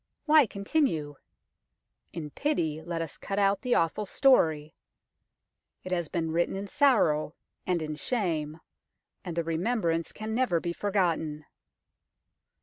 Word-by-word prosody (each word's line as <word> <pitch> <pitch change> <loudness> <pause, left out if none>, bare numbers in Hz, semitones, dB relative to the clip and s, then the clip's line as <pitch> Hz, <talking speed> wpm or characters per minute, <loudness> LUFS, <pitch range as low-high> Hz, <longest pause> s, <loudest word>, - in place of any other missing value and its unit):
Why 305 -4 +6
continue? 200 - -1 0.9
In 150 -3 -6
pity, 160 - -1
let 165 0 -3
us 160 - -8
cut 195 - -4
out 200 -1 +2
the 250 -2 +1
awful 180 +5 0
story. 160 - +3 1.1
It 185 - -7
has 175 -3 0
been 165 -2 -2
written 170 +3 0
in 195 +1 -4
sorrow 200 - +2 0.3
and 175 -3 0
in 155 0 -4
shame, 160 -9 -2 0.6
and 175 - -5
the 170 - +1
remembrance 165 0 -1
can 215 +1 -5
never 225 -8 +2
be 170 +1 -3
forgotten. 170 -7 -1
175 Hz, 130 wpm, -28 LUFS, 160-210 Hz, 1.1 s, Why